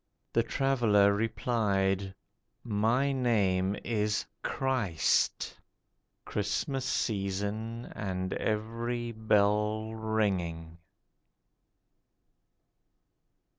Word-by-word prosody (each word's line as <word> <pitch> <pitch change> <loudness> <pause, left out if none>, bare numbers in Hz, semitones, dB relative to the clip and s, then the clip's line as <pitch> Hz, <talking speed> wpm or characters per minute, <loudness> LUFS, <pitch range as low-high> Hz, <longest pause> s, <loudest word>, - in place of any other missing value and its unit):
The - - +4
Traveller 115 -7 +3
replied, 100 -3 0 0.5
'My 115 +5 +2
name 100 -7 +1
is 105 -2 0 0.2
CHRIST.' 115 -12 0 0.7
(Christmas 115 +6 -1
season, 110 0 -2
and 95 -2 -3
every 115 +2 -2
bell 105 0 +1
ringing.) 95 -7 -1
105 Hz, 55 wpm, -30 LUFS, 100-115 Hz, 0.7 s, The